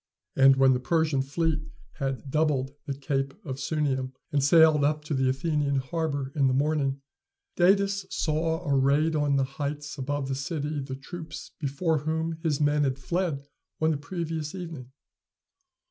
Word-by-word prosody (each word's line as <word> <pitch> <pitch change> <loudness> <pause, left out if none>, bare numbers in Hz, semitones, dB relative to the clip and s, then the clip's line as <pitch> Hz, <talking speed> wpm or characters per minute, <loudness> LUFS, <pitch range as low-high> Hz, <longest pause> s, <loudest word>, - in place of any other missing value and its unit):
And 135 0 +7
when 135 0 +5
the 125 - 0
Persian 155 +1 +1
fleet 160 +3 0 0.4
had 135 -1 -3
doubled 150 -3 +1 0.2
the 140 - -2
Cape 135 -1 -2
of 135 -2 -5
Sunium 135 -4 -1 0.2
and 145 -3 +2
sailed 155 0 +6
up 150 +1 +1
to 150 - -3
the 130 -1 +2
Athenian 145 +1 0
harbor 140 0 -2
in 140 -3 +3
the 130 - +2
morning, 140 -1 0 0.5
Datis 195 +1 +3
saw 160 +1 -1
arrayed 140 +3 +3
on 145 -2 +2
the 135 - +3
heights 145 +1 -4
above 140 +1 -2
the 135 - -2
city 145 +2 -3
the 135 -1 -5
troops 160 +3 -8
before 155 +2 0
whom 160 +2 -2
his 155 -4 0
men 145 0 +3
had 135 -1 0
fled 160 -1 -2 0.3
on 160 0 +3
the 150 - 0
preceding 160 +2 -4
evening. 155 -8 -8
145 Hz, 160 wpm, -27 LUFS, 135-160 Hz, 0.5 s, And